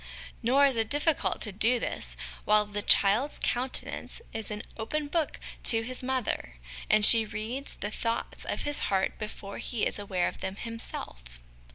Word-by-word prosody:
Nor 270 +5 +4
is 270 -4 +2
it 225 -1 +1
difficult 295 +2 +1
to 210 - -1
do 225 +5 +3
this - - -4 0.3
while 210 0 +4
the 205 0 -4
child's 210 +8 +4
countenance 255 - -2
is 220 -1 -4
as 210 - -4
an - - -8
open 290 +7 -3
book 320 +1 -1 0.3
to 225 -1 +2
his 255 +2 -2
mother, 255 - -2 0.3
and 215 -1 +7
she 225 0 +10
reads 220 +6 -5
the 205 - -5
thoughts 230 +1 -3
of - - -3
his 290 0 0
heart 190 -1 0
before 205 -2 -7
he 235 -4 -1
is - - -1
aware 190 -3 -1
of - - -6
them 190 0 -4
himself. 60 - -8
225 Hz, 175 wpm, -29 LUFS, 205-255 Hz, 0.3 s, she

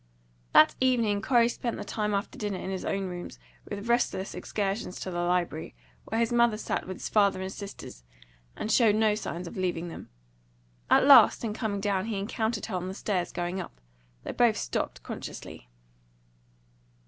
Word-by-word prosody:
That - - +7
evening 230 -6 +2
Corey 235 0 +4
spent 240 0 -3
the - - -5
time 210 -1 -1
after 200 +2 -3
dinner 205 -3 -3
in 190 - -5
his 190 - -4
own 195 0 -1
room, 175 -1 -6 0.4
with 205 +2 -5
restless 235 -5 0
excursions 200 -2 -3
to 185 - -4
the 175 - -3
library, 175 - -1 0.3
where 225 - -2
his 230 0 +1
mother 235 -2 +4
sat 215 - -3
with 185 - -5
his - - -5
father 200 -3 +3
and 190 0 -4
sisters, 200 - -9 0.5
and 220 - -3
showed 220 -2 +5
no 215 -1 +3
signs 180 -4 -4
of 170 - -8
leaving 175 -2 -2
them. - - -9 0.8
At - - +5
last, - - +8
in 220 -2 -2
coming 210 -3 -2
down, 195 -1 0
he 220 -3 -2
encountered 220 +2 -2
her 210 - -4
on 180 0 -3
the 190 - -5
stairs, 190 -4 -1
going 175 +2 -3
up. 165 - -11 0.4
They - - -4
both - - +3
stopped - - -3
consciously. - - -8
200 Hz, 180 wpm, -28 LUFS, 180-220 Hz, 0.8 s, last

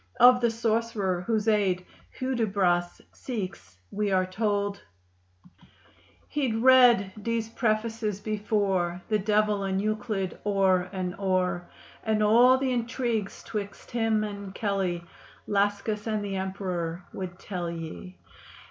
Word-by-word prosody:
Of 250 0 +8
the 235 - +3
sorcerer 225 -5 0
whose 220 -2 0
aid 195 -4 +2 0.3
Hudibras 200 -9 0
seeks 185 - -6
we 210 -1 -1
are 185 -1 +3
told: 205 +1 -1 1.5
He'd 265 -6 -1
read 240 -5 +6
Dee's 230 0 -1
prefaces 220 -2 -1
before, 200 -4 0
The 215 -1 +2
Dev'l 210 0 +2
and 190 0 0
Euclid 210 -2 -2
o'er 190 -3 +2
and 185 -2 -3
o'er; 185 -2 0 0.3
And 215 -1 +1
all 240 +5 +6
th' 265 - -3
intrigues 235 -4 -1
'twixt 205 -3 -6
him 225 -2 +1
and 200 -2 -6
Kelley, 190 -5 -1 0.4
Lascus 205 +1 0
and 215 -2 -1
th' 200 -1 -4
Emperor, 185 -3 -3
would 180 -2 -6
tell 180 -3 -4
ye. 170 +2 -7
205 Hz, 120 wpm, -27 LUFS, 190-225 Hz, 1.5 s, Of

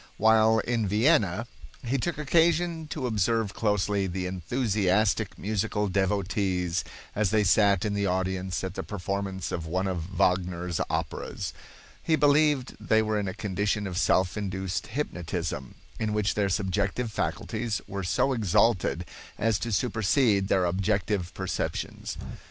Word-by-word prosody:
While 110 +1 +5
in 115 -1 0
Vienna 110 - +3 0.4
he 130 +3 0
took 175 +6 -2
occasion 165 +1 +2
to 145 -3 -4
observe 110 -2 +1
closely 105 -2 +1
the 90 0 -3
enthusiastic 100 +1 0
musical 105 0 -1
devotees 95 -2 0 0.3
as 105 -2 +1
they 110 +1 +3
sat 100 0 +4
in 105 - 0
the 100 0 0
audience 95 0 -1
at 95 -1 -3
the - - -4
performance 100 -1 -3
of 80 -2 -3
one 95 +4 -1
of 90 -3 -2
Wagner's 90 -1 +1
operas. - - -3 0.5
He 160 - +2
believed 145 -3 +3
they 110 0 +2
were 110 -1 0
in 100 - -2
a 95 - -4
condition 105 +1 -1
of 95 -2 -4
self 95 -1 +2
induced 95 -1 -3
hypnotism, 90 - -4 0.2
in 110 -1 -1
which 105 -1 +1
their 100 -2 +1
subjective 100 +4 -1
faculties 110 +1 -2
were 100 0 -4
so 110 +9 +1
exalted 100 -4 +2 0.3
as 110 -1 +1
to 120 - -3
supersede 110 -1 +2
their 95 -2 +2
objective 95 0 0
perceptions. 95 -1 -3
100 Hz, 140 wpm, -27 LUFS, 95-110 Hz, 0.5 s, While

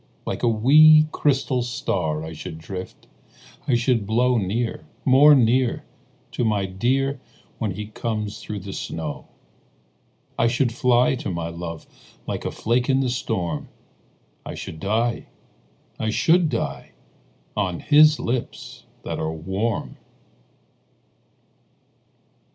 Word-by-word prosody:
Like - - -4
a - - +2
wee, 155 +7 +6
crystal 135 -3 +1
star 80 -10 -2
I 80 0 -7
should 80 +1 -8
drift, 90 +3 -8 0.6
I 130 - +3
should 120 -3 +1
blow 120 +2 +2
Near, 110 +4 -2 0.2
more 145 +3 +7
near, 125 0 +2 0.5
To - - -2
my 105 -3 +1
dear 130 +8 -1 0.4
Where 110 - -1
he 105 +3 -5
comes 105 -1 -4
through 105 -2 -6
the 95 +1 -7
snow. - - -5 1.1
I 115 - +4
should 120 +1 +1
fly 125 -1 +3
to - - -5
my 85 -2 -3
love 85 -1 -7 0.4
Like - - -4
a - - -2
flake 120 +3 0
in 135 0 +3
the 130 -2 0
storm, 90 - -3 0.7
I - - -7
should 80 - -8
die, 115 +6 -1 0.7
I 110 - -1
should 165 +8 +3
die, - - -4 0.6
On 95 -4 -1
his 150 0 +5
lips 120 0 -4 0.2
that - - -4
are 80 - -2
warm. 95 +8 -3
115 Hz, 125 wpm, -23 LUFS, 95-130 Hz, 1.1 s, more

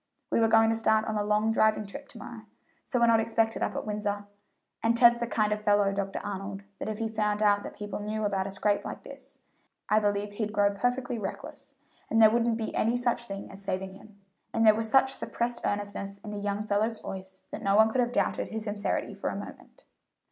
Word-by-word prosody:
We - - +3
were 225 - +4
going 225 0 +5
to - - +1
start 220 -1 +2
on 220 - -2
a 210 - +1
long 210 +1 +2
driving 220 -1 +2
trip 200 - -9
to - - -13
morrow; - - -9 0.4
so 250 - -1
we're 235 - +5
not 230 -1 +5
expected 225 0 0
up - - -1
at - - -3
Windsor, 205 -1 -2 0.6
and 230 +1 +2
Ted's 235 0 +6
the 235 - -1
kind 215 -2 +1
of 210 - -4
fellow, 205 -1 +3
Dr. 195 0 -2
Arnold, 195 0 -5 0.2
that - - -3
if 215 - -3
he 225 0 -1
found 215 -1 0
out 205 -1 +4
that - - -9
people 205 -1 -5
knew 215 +1 -2
about 195 -1 0
a - - -4
scrape 205 +1 0
like - - -7
this, - - -12 0.5
I 215 - +5
believe 205 -1 0
he'd 210 0 -3
grow 205 -1 +3
perfectly 245 +3 -1
reckless, 195 -2 -7 0.3
and 225 - +2
there 220 -1 +8
wouldn't 235 0 +2
be 220 -2 -4
any 230 +2 +1
such 240 -1 0
thing 195 -2 -7
as 195 +1 -10
saving 190 -1 -3
him;" 205 +1 -16 0.4
and 225 0 +3
there 215 - +8
was 220 +1 -1
such 265 +2 +4
suppressed 240 0 -3
earnestness 205 -1 -3
in 210 - -5
the 205 - -4
young 205 +1 -2
fellow's 215 +2 0
voice 190 0 -8
that - - -6
no 195 0 +2
one 220 +1 +6
could 255 - +2
have 240 0 0
doubted - - 0
his 220 -1 -4
sincerity 205 -1 -2
for - - -3
a - - -4
moment. - - -10
215 Hz, 230 wpm, -28 LUFS, 205-225 Hz, 0.6 s, there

